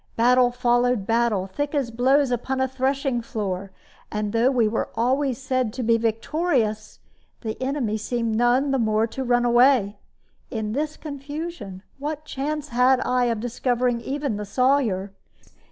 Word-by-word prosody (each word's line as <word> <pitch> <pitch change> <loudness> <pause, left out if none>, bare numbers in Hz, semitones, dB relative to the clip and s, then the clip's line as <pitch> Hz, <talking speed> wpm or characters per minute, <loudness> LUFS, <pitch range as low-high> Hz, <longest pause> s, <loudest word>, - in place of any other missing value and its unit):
Battle 250 +1 +4
followed 245 -2 +1
battle, 225 -4 +1
thick 290 +10 -3
as 270 -5 0
blows 260 +3 +3
upon 260 +2 -1
a 260 - +2
threshing 265 -1 -1
floor, 195 -4 -4 0.4
and 210 0 -2
though 230 +3 +3
we 245 -5 +2
were 220 +1 -2
always 260 +2 +1
said 255 -3 -1
to 255 - -4
be 230 0 +3
victorious, 225 -1 -1 0.4
the 220 -2 -4
enemy 260 -5 -1
seemed 230 +1 -2
none 245 +4 +2
the 270 - +1
more 220 -1 +2
to 265 +3 -5
run 245 -1 +2
away. 240 -4 +4 0.5
In 220 -3 -3
this 300 +5 -2
confusion, 285 - -7 0.2
what 300 +1 -4
chance 300 +2 -4
had 250 +1 +4
I 250 0 +1
of 230 -2 0
discovering 245 0 0
even 275 -3 -3
the 210 - -4
Sawyer? 220 -5 +1
245 Hz, 155 wpm, -24 LUFS, 225-270 Hz, 0.5 s, Battle